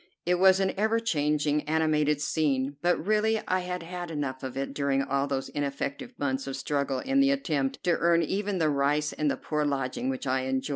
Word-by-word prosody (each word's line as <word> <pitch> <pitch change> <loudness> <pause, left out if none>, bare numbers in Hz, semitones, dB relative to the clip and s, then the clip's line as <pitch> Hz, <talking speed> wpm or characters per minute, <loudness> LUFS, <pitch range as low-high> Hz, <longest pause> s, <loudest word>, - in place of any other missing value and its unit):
It 180 +1 +2
was 190 0 +6
an 190 -1 +1
ever 220 +3 +2
changing, 150 -6 +1
animated 150 -2 +2
scene; 145 -3 0
but 175 +1 +3
really 215 +1 +2
I 185 - +2
had 180 -1 -4
had 175 0 -6
enough 140 -4 -3
of 130 0 -6
it 135 0 -3
during 140 -1 +1
all 140 0 0
those 135 -1 -2
ineffective 140 - -4
months 135 -1 -2
of 135 - -3
struggle 140 0 -1
in 270 - +1
the 275 0 +5
attempt 150 - -1
to 175 -2 +2
earn 170 0 +3
even 200 +3 -1
the 160 -3 +2
rice 145 +2 +1
and 150 -1 0
the - - -1
poor 150 -1 -2
lodging 135 -3 -1
which 130 +1 -3
I 130 0 +1
enjoyed. 130 +1 -1
150 Hz, 205 wpm, -28 LUFS, 140-180 Hz, -, was